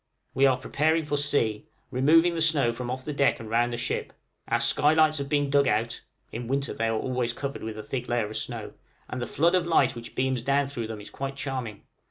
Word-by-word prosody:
We 135 Hz, +1 st, +4 dB
are 130 Hz, -1 st, +3 dB
preparing 155 Hz, +4 st, 0 dB
for 145 Hz, 0 st, -1 dB
sea, 140 Hz, -7 st, +1 dB, 0.2 s
removing 165 Hz, +7 st, +4 dB
the 165 Hz, -, -2 dB
snow 150 Hz, -7 st, +4 dB
from 120 Hz, +1 st, -5 dB
off 130 Hz, +1 st, -4 dB
the 150 Hz, -, -3 dB
deck 140 Hz, 0 st, +2 dB
and 110 Hz, -1 st, -8 dB
round 120 Hz, +1 st, +2 dB
the 120 Hz, -, -3 dB
ship; 115 Hz, -, -3 dB, 0.3 s
our 120 Hz, -, +1 dB
sky 130 Hz, +6 st, +3 dB
lights 155 Hz, -1 st, +4 dB
have 140 Hz, 0 st, -4 dB
been 145 Hz, -2 st, +1 dB
dug 140 Hz, -1 st, +4 dB
out 115 Hz, +1 st, 0 dB, 0.3 s
(in 120 Hz, +1 st, -5 dB
winter 135 Hz, +1 st, -1 dB
they 115 Hz, -, -1 dB
are 115 Hz, 0 st, 0 dB
always 125 Hz, -1 st, -1 dB
covered 140 Hz, +2 st, -5 dB
with 110 Hz, -1 st, -6 dB
a 110 Hz, -, -6 dB
thick 125 Hz, -2 st, -4 dB
layer 120 Hz, -2 st, +1 dB
of 105 Hz, +1 st, -7 dB
snow), -, -, -4 dB, 0.3 s
and 125 Hz, -, -5 dB
the 120 Hz, -, -3 dB
flood 170 Hz, +5 st, +2 dB
of 180 Hz, -2 st, +2 dB
light 165 Hz, -, +3 dB
which 120 Hz, -1 st, -10 dB
beams 130 Hz, -1 st, 0 dB
down 140 Hz, +3 st, +2 dB
through 120 Hz, -5 st, -4 dB
them 110 Hz, -2 st, -7 dB
is 105 Hz, -, -11 dB
quite 135 Hz, 0 st, -5 dB
charming. 130 Hz, -7 st, -5 dB
130 Hz, 240 wpm, -26 LUFS, 115-145 Hz, 0.3 s, We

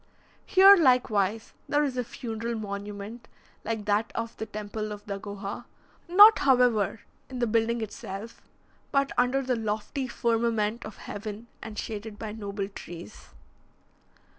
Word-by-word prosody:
Here, 390 Hz, +1 st, +9 dB
likewise, 225 Hz, -, +2 dB, 0.2 s
there 295 Hz, +1 st, +3 dB
is 275 Hz, -3 st, -1 dB
a 250 Hz, -, 0 dB
funeral 230 Hz, 0 st, -5 dB
monument, 205 Hz, +2 st, -6 dB, 0.4 s
like 225 Hz, -2 st, -3 dB
that 210 Hz, +2 st, +1 dB
of 230 Hz, 0 st, -3 dB
the 220 Hz, -, -5 dB
Temple 215 Hz, 0 st, -5 dB
of 205 Hz, 0 st, -8 dB
Dagoha, 200 Hz, 0 st, -6 dB, 0.4 s
not 410 Hz, +5 st, +9 dB
however, 245 Hz, -6 st, +3 dB, 0.3 s
in 260 Hz, -, -6 dB
the 245 Hz, -, +1 dB
building 230 Hz, +1 st, +1 dB
itself, 215 Hz, +1 st, -7 dB, 0.5 s
but 275 Hz, -1 st, +2 dB
under 250 Hz, +2 st, +2 dB
the 255 Hz, -1 st, 0 dB
lofty 220 Hz, +5 st, -3 dB
firmament 230 Hz, -2 st, 0 dB
of 215 Hz, -, -11 dB
heaven, 210 Hz, +2 st, -7 dB, 0.2 s
and 215 Hz, -2 st, -8 dB
shaded 215 Hz, 0 st, -5 dB
by 215 Hz, -1 st, -5 dB
noble 200 Hz, -2 st, -4 dB
trees. 175 Hz, -, -10 dB
225 Hz, 135 wpm, -27 LUFS, 205-245 Hz, 0.5 s, Here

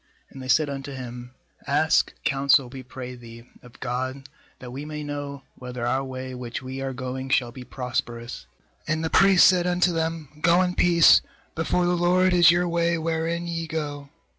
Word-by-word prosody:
&And 135 Hz, -, -10 dB
they 130 Hz, -, -7 dB
said 140 Hz, +5 st, +3 dB
unto 140 Hz, 0 st, -6 dB
him: 125 Hz, -1 st, -8 dB, 0.3 s
'Ask 150 Hz, +3 st, +2 dB
counsel, 135 Hz, -2 st, +3 dB
we 130 Hz, +1 st, -8 dB
pray 125 Hz, 0 st, -8 dB
thee, 115 Hz, -1 st, -13 dB
of 125 Hz, +1 st, -17 dB
God, 130 Hz, +2 st, -4 dB, 0.3 s
that 125 Hz, -1 st, -10 dB
we 135 Hz, +3 st, -6 dB
may 150 Hz, 0 st, -6 dB
know 145 Hz, -1 st, -6 dB
whether 125 Hz, -1 st, -6 dB
our 130 Hz, +2 st, 0 dB
way 130 Hz, -1 st, -6 dB
which 125 Hz, -1 st, -5 dB
we 130 Hz, +1 st, -6 dB
are 135 Hz, 0 st, -3 dB
going 130 Hz, +1 st, -5 dB
shall 120 Hz, -2 st, +1 dB
be 125 Hz, +1 st, -10 dB
prosperous.' 120 Hz, -, -5 dB, 0.4 s
6And 155 Hz, +1 st, 0 dB
the 160 Hz, -, -2 dB
priest 195 Hz, -2 st, +6 dB
said 180 Hz, -1 st, +3 dB
unto 180 Hz, 0 st, +2 dB
them: 160 Hz, -2 st, -4 dB
'Go 170 Hz, +3 st, +4 dB
in 180 Hz, -1 st, -1 dB
peace; 170 Hz, -2 st, +6 dB, 0.3 s
before 170 Hz, +2 st, 0 dB
the 175 Hz, 0 st, +2 dB
LOED 180 Hz, +1 st, +3 dB
is 175 Hz, -1 st, +7 dB
your 175 Hz, +1 st, +3 dB
way 170 Hz, 0 st, +1 dB
wherein 165 Hz, +1 st, -2 dB
ye 165 Hz, -1 st, -4 dB
go.' 145 Hz, -3 st, -5 dB
140 Hz, 185 wpm, -24 LUFS, 130-165 Hz, 0.4 s, is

